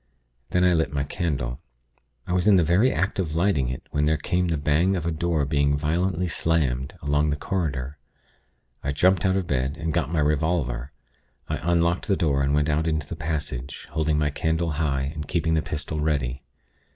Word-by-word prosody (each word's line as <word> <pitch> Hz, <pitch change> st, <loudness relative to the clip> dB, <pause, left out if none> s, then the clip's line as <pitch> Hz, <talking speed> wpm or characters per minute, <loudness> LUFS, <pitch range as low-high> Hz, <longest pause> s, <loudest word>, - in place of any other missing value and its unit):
Then 90 Hz, -, +2 dB
I 90 Hz, -1 st, +5 dB
lit 80 Hz, -4 st, +1 dB
my 70 Hz, -1 st, -1 dB
candle. 70 Hz, -6 st, -2 dB, 0.7 s
I 90 Hz, -, -2 dB
was 90 Hz, +2 st, +1 dB
in 105 Hz, -, +7 dB
the 90 Hz, -, +5 dB
very 95 Hz, +11 st, +3 dB
act 95 Hz, +5 st, -1 dB
of 80 Hz, -4 st, -1 dB
lighting 80 Hz, -8 st, +2 dB
it 65 Hz, -, -5 dB
when 75 Hz, 0 st, +1 dB
there 80 Hz, 0 st, +2 dB
came 90 Hz, +4 st, 0 dB
the 80 Hz, -2 st, 0 dB
bang 75 Hz, +7 st, +2 dB
of 85 Hz, -3 st, -3 dB
a 85 Hz, -, 0 dB
door 80 Hz, -2 st, 0 dB
being 70 Hz, 0 st, +2 dB
violently 90 Hz, +4 st, 0 dB
slammed, 75 Hz, -6 st, 0 dB
along 75 Hz, +1 st, +2 dB
the 75 Hz, -, +1 dB
corridor. 75 Hz, -5 st, -3 dB, 0.8 s
I 70 Hz, -, -1 dB
jumped 95 Hz, +4 st, +3 dB
out 95 Hz, -, +2 dB
of 95 Hz, -2 st, 0 dB
bed, 65 Hz, 0 st, -1 dB
and 80 Hz, 0 st, -2 dB
got 80 Hz, -3 st, 0 dB
my 85 Hz, -, -1 dB
revolver. 75 Hz, -4 st, 0 dB, 0.6 s
I -, -, -1 dB
unlocked 85 Hz, +1 st, +1 dB
the 100 Hz, -, +3 dB
door, 70 Hz, -4 st, +1 dB
and 70 Hz, +1 st, +2 dB
went 75 Hz, 0 st, +2 dB
out 80 Hz, +1 st, +1 dB
into 80 Hz, -2 st, 0 dB
the 80 Hz, -, -6 dB
passage, 75 Hz, -5 st, -4 dB
holding 80 Hz, -1 st, +1 dB
my 75 Hz, -1 st, +1 dB
candle 80 Hz, +2 st, 0 dB
high, 70 Hz, -2 st, -1 dB
and 75 Hz, -2 st, -6 dB
keeping 80 Hz, -1 st, 0 dB
the 80 Hz, -, +2 dB
pistol 75 Hz, -1 st, -4 dB
ready. 70 Hz, -4 st, -1 dB
80 Hz, 200 wpm, -25 LUFS, 70-85 Hz, 0.8 s, in